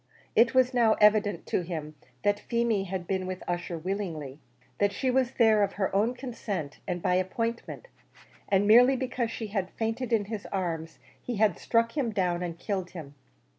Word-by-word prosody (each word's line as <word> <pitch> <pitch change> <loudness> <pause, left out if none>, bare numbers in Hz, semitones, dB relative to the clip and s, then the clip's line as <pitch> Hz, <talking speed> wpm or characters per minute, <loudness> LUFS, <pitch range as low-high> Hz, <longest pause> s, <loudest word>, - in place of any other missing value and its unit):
It 230 +3 +4
was 255 0 +4
now 235 -3 +4
evident 210 -1 +3
to - - 0
him 160 -3 -5 0.3
that 205 0 +2
Feemy 235 -4 0
had 185 -1 -4
been 190 0 -2
with 185 0 -5
Ussher 175 -1 -3
willingly 160 -6 -4 0.4
that 200 0 +3
she 255 +5 -1
was 260 0 +1
there 220 -3 +4
of 200 - +1
her 195 -1 -1
own 225 +5 +2
consent 210 - -5
and 180 -2 -3
by 180 - +2
appointment; 230 - -2 0.6
and 200 +1 +3
merely 245 +5 +7
because 250 -2 -2
she 225 -2 -5
had 190 -3 -1
fainted 230 +3 -3
in 220 -3 +2
his 210 -1 -6
arms, 165 -4 -3 0.2
he 245 - -4
had 210 -3 +2
struck 230 +1 +1
him 275 -6 0
down 180 -5 0
and 170 -2 -4
killed 190 0 -3
him. 145 -4 -8
205 Hz, 180 wpm, -28 LUFS, 180-230 Hz, 0.6 s, merely